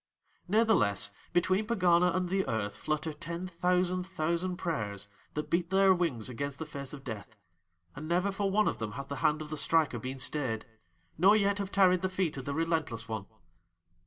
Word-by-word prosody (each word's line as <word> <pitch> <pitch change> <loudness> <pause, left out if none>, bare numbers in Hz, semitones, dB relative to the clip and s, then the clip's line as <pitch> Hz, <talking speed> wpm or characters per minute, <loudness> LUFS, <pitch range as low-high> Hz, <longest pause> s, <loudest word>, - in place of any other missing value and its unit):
"Natheless 185 - +3 0.2
between 185 +4 +2
Pegana 180 -5 +4
and 185 -1 0
the 190 +2 +1
Earth 110 -4 -2
flutter 155 +1 -2
ten 170 +4 -5
thousand 180 +1 0
thousand 180 0 -1
prayers 105 - -3 0.3
that 150 - -3
beat 170 0 +1
their 195 0 +5
wings 165 - -1
against 140 +2 -4
the 160 - -5
face 140 -3 -7
of 140 -2 -9
Death, 110 -3 -7 0.6
and 150 +2 -6
never 180 +4 +1
for 195 0 -1
one 210 +2 +3
of - - -1
them 110 -2 -4
hath 140 +2 -7
the 140 - -4
hand 155 +3 +1
of 150 - -10
the 155 - -3
Striker 155 -4 +2
been 130 +4 -5
stayed, 130 -5 -2 0.5
nor 195 +5 +7
yet 200 -1 +2
have 200 -1 -3
tarried 185 -2 +4
the 185 - 0
feet 185 -4 -1
of 135 -2 -6
the 140 - -3
Relentless 160 -9 -1
One. 110 -3 -4
165 Hz, 190 wpm, -31 LUFS, 135-185 Hz, 0.6 s, nor